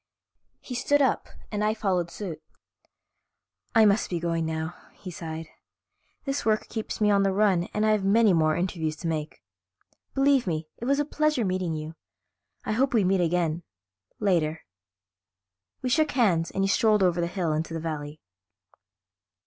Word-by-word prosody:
He 255 - -8
stood 290 +4 +2
up 270 -2 +1 0.2
and 210 -1 -1
I 215 +1 +1
followed 185 -5 0
suit. 170 -4 -6 1.3
"I 225 -1 +7
must 205 +1 +3
be 175 - -2
going 165 -1 -1
now," 160 +1 -3 0.2
he 185 - -9
sighed. 160 -1 -6 0.8
"This 275 0 -2
work 215 -1 +1
keeps 220 -2 -4
me 210 -1 +3
on 200 -1 +4
the 195 0 +2
run 190 -3 +2
and 210 +1 0
I 215 - +4
have 210 -2 +1
many 210 +1 +4
more 155 -2 +3
interviews 170 -3 -2
to 170 - -6
make. 155 - -4 0.7
Believe 270 -4 +3
me, 160 -2 -2
it 235 - -6
was 280 +2 +2
a 295 - +1
pleasure 305 -5 +1
meeting 185 -3 -1
you. 155 +1 -6 0.7
I - - -1
hope 255 +3 +1
we 215 - +4
meet 190 0 +2
again 170 -1 0 0.6
later." 165 -6 +1 1.2
We 255 - 0
shook 310 +4 +3
hands 185 -10 +2
and 195 - -1
he - - +2
strolled 210 0 +3
over 175 -1 +2
the 170 - 0
hill 175 -3 -1
into 160 +2 -2
the - - -2
valley. 155 -2 -5
185 Hz, 170 wpm, -26 LUFS, 165-215 Hz, 1.3 s, I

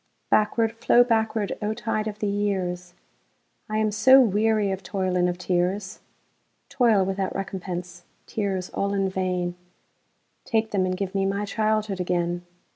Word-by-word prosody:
Backward, 220 +1 +3
flow 230 +1 +4
backward, 220 -3 0
O 210 +1 -1
tide 220 -2 -2
of 210 -1 -5
the 210 - -2
years!I 190 +1 -5
am 215 -1 +1
so 260 +6 +7
weary 215 -3 +2
of 190 0 -3
toil 185 -2 -2
and 180 0 +2
of 175 - -3
tears,—Toil 190 +4 -1
without 195 0 -2
recompense, 180 -2 -5 0.2
tears 195 -4 -3
all 200 0 -1
in 195 -1 +1
vain,—Take 180 +4 -4
them, 190 -2 +1
and 185 0 -2
give 195 -1 -3
me 195 -1 +1
my 200 +1 -1
childhood 215 -2 0
again! 175 -1 -1
195 Hz, 135 wpm, -25 LUFS, 180-215 Hz, 0.2 s, so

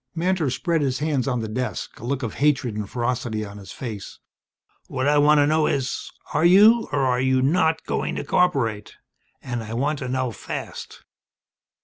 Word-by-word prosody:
Mantor 170 -3 +1
spread 165 +5 0
his 130 -2 0
hands 145 -4 -1
on 125 -3 0
the 110 - -3
desk, 110 -2 -4
a - - -12
look 130 +2 -2
of 115 - -3
hatred 135 -6 +1
and 105 -1 -4
ferocity 120 -3 -2
on 100 0 -10
his 100 - -11
face. 110 -6 -7 0.7
"What 130 +2 -2
I 145 0 +4
want 150 +1 +5
to 145 - +5
know 155 +1 +2
is 135 -2 -2 0.2
are - - +1
you 210 +7 +6
or 145 - +1
are 125 -1 +1
you 130 0 +2
not 160 +2 +2
going - - -2
to - - -3
cooperate? 130 -13 0 0.5
And 120 -3 -3
I 110 +1 -6
want 145 +4 0
to 130 - -4
know 130 -1 -1
fast." 105 - -7
130 Hz, 190 wpm, -23 LUFS, 120-150 Hz, 0.7 s, you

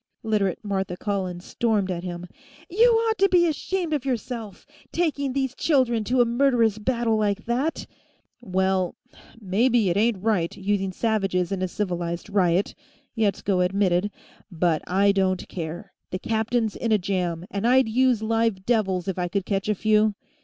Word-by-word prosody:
Literate 210 -5 0
Martha 190 -3 -2
Collins 185 -3 -3
stormed 210 -5 0
at 175 -1 -4
him. 175 -1 -5 0.5
"You 460 +6 +5
ought 450 -1 +1
to 395 0 +4
be 355 -2 +4
ashamed 340 +1 -2
of 290 -4 -1
yourself, 235 -5 -4 0.3
taking 295 -5 0
these 265 -2 -1
children 255 -7 +1
to 250 +2 +2
a - - +5
murderous 235 -3 +2
battle 235 0 0
like 210 -1 -1
that 255 +7 -1 0.3
" - - -44
"Well, 190 -3 0 0.4
maybe 220 +1 +2
it 175 - 0
ain't 220 0 +2
right, 195 -7 0
using 195 -1 -1
savages 195 -4 0
in 195 -1 -2
a 185 - 0
civilized 175 -1 -3
riot," 185 -1 +2 0.4
Yetsko 200 -3 0
admitted, 185 0 +1 0.4
"but 165 -2 +1
I 200 +2 +3
don't 190 -2 0
care. 175 +4 -6 0.2
The 185 - -3
captain's 225 +1 -1
in 230 - -2
a 215 - +5
jam, 180 -3 -2
and 200 +3 -1
I'd 260 0 +4
use 245 0 +2
live 225 -3 0
devils, 195 -6 0
if 190 -1 -2
I 175 - 0
could 195 +1 -2
catch 195 0 -1
a 210 - +2
few." 215 0 +2
210 Hz, 165 wpm, -24 LUFS, 185-240 Hz, 0.5 s, You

